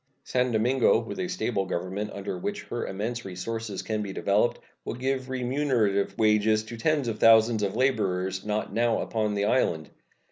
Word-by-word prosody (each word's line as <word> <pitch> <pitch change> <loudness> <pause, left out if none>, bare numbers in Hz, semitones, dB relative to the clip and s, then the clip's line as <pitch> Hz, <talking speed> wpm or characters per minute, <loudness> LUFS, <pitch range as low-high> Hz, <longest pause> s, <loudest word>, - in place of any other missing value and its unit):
San 125 0 0
Domingo, 120 +3 +3
with 115 +10 -6
a 185 - -1
stable 120 - -1
government, 95 +5 -3
under 100 0 -5
which 205 +3 -4
her 120 - -4
immense 115 +5 -3
resources 105 +2 -5
can 110 -1 -2
be 100 -2 -4
developed, 100 +4 +1 0.3
will - - -4
give 130 +1 -2
remunerative 125 -7 0
wages 110 0 +3
to 115 +2 -8
tens 145 +2 0
of 110 -2 -3
thousands 115 0 +6
of 100 0 -1
laborers 95 -7 0
not 105 0 -2
now 120 0 +2
upon 105 -2 -1
the 100 0 +1
island. 85 - +1
110 Hz, 170 wpm, -27 LUFS, 100-125 Hz, 0.3 s, thousands